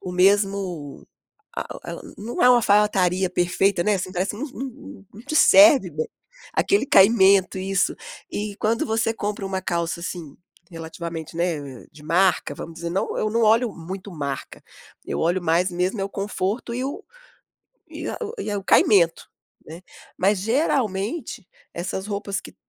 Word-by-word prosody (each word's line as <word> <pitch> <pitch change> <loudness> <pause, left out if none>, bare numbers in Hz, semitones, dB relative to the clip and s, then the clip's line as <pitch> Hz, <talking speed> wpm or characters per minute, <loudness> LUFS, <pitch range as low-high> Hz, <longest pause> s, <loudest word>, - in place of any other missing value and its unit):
o 185 - -6
mesmo 190 -5 0 0.5
a - - -4
o - - -10
e - - -26
ela - - -7 0.2
não 225 +4 -3
é 250 - +7
uma 250 - +7
alfaiataria 200 -4 +2
perfeita, 180 +1 +1
né, 210 - +3
assim, 185 -1 -3
parece 190 +3 -2
não 285 +8 -4
não 265 -6 -9
não 215 - -11
te 285 +4 -3
serve 295 - +7
bem. 155 0 -4 0.5
Aquele 400 -7 +2
caimento, 195 -4 +5
isso. 190 0 0 0.4
E 205 -6 -4
quando 225 +3 0
você 225 0 0
compra 205 -2 -4
uma 190 -1 -2
calça 170 -2 -2
assim, 170 -4 -7 0.3
relativamente, 165 -1 -7
né, 150 -7 -3
de 150 - -15
marca 175 -1 +2
vamos 165 - -8
dizer 170 +1 -5
não 185 - -2
eu 215 - 0
não 230 +2 +1
olho 225 +2 +4
muito 185 +4 -8
marca. 140 -4 -5 0.4
Eu - - -3
olho 175 +3 +1
mais 175 +3 +2
mesmo 180 +4 -1
é - - 0
o - - -4
conforto 200 +3 -3
e 250 - -2
o 285 +10 -5 0.8
e - - -6
a - - -4
o 445 +1 -5
e 210 - -3
o 200 - -4
caimento, 175 -5 +3 0.4
né. 165 +4 -10 0.4
Mas, 195 +1 +2
geralmente, 225 - -1 0.3
essas 190 +3 -4
roupas 200 -1 -3
que - - -13
195 Hz, 165 wpm, -23 LUFS, 175-215 Hz, 0.8 s, é